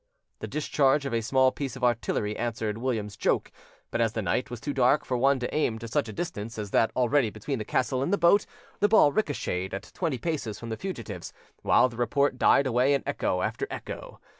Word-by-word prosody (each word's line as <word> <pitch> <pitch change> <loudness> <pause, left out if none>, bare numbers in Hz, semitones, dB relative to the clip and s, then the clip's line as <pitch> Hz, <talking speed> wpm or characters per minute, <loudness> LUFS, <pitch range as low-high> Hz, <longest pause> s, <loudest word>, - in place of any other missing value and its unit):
The - - -5
discharge 145 -1 +1
of 135 - -3
a 115 - +1
small 130 +3 +3
piece 135 -2 -5
of 130 - -9
artillery 115 -3 0
answered 110 -2 -3
William's 110 -5 -2
joke; - - 0 0.4
but - - 0
as 115 -1 +1
the 110 - -2
night 95 +8 0
was 120 - -6
too 145 +4 -3
dark 130 +2 +3
for 125 - -1
one 135 +3 +3
to 125 -1 -4
aim 125 -7 +1
to 115 +1 -7
such 110 0 -1
a - - -4
distance 115 - -5
as 105 -2 -5
that 115 - +3
already 125 -1 +2
between 115 +5 -4
the 110 - -4
castle 130 0 0
and 140 - -1
the 200 - +3
boat, 175 +4 +4 0.3
the 205 - +4
ball 205 -9 +6
ricochetted 95 - -2
at 100 - -8
twenty 160 -7 -1
paces 140 -7 -3
from 115 - -8
the 110 - -2
fugitives, 110 - -6 0.3
while - - +4
the 120 -2 -11
report 130 +2 +1
died 140 - +5
away 130 +2 +3
in 140 - -2
echo 90 -10 -1
after - - -2
echo. - - -7
125 Hz, 220 wpm, -27 LUFS, 110-140 Hz, 0.4 s, ball